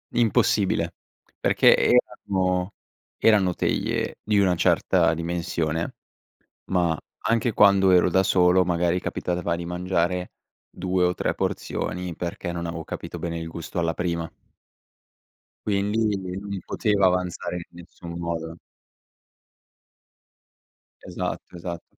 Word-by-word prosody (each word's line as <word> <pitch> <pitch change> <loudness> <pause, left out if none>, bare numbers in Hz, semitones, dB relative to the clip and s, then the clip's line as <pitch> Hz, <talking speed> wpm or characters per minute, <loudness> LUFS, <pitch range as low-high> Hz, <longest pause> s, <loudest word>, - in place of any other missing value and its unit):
Impossibile, 105 -3 +2 0.5
perché - - +5
erano 90 -1 +1 0.5
erano 100 -5 +5
teglie - - -1
di 105 -1 +2
una 95 -3 +3
certa 85 - +3
dimensione, 85 -1 -2 0.8
ma 85 -3 +1 0.3
anche 115 +1 +2
quando 100 -2 +5
ero 90 0 +5
da 95 - +4
solo, 90 -1 +4
magari 85 0 +1
capitava 85 -1 -2
di 85 - -5
mangiare 90 0 -1 0.4
2 90 0 0
o 90 - +2
3 - - -1
porzioni 90 -2 -3
perché 85 0 -4
non 85 0 -4
avevo 85 0 -4
capito - - -6
bene 85 -1 -3
il 80 - -5
gusto 85 +2 -6
alla 85 -1 0
prima. 85 -2 -2 1.4
Quindi 105 +1 +1
non 95 +2 -6
mi 100 -1 -4
poteva 100 -3 +2
avanzare 90 -1 -1
in 85 - -4
nessun 85 0 -9
modo. 85 -1 -4 2.5
Esatto, - - -5
esatto. 85 -1 -6
90 Hz, 115 wpm, -25 LUFS, 85-95 Hz, 2.5 s, perché